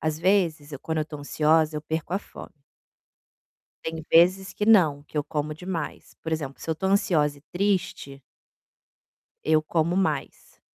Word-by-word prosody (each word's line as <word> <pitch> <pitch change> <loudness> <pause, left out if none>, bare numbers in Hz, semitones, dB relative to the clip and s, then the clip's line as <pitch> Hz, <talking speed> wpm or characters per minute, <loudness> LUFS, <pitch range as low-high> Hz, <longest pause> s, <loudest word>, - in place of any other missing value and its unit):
às 155 -1 -1
vezes 165 -5 +1
eu 140 - -5
quando 160 -1 -2
eu - - +2
estou 150 -1 -8
ansiosa 155 +1 +2
eu 150 - -4
perco 160 +2 -4
a - - +1
fome - - -12 1.3
tem 160 -1 -5
vezes 185 +3 +5
que 210 - -2
não, 165 -10 +5
que 150 - -13
eu 145 - +1
como 150 +1 -3
demais, 170 -2 -6
por 160 - -4
exemplo, 145 -4 -4
se - - -9
eu 160 - +2
estou 190 +4 -2
ansiosa 150 -7 +2
e - - -21
triste 175 -8 -1 1.2
eu 155 0 +3
como 165 +2 0
mais. 190 0 -2
160 Hz, 170 wpm, -25 LUFS, 150-180 Hz, 1.3 s, vezes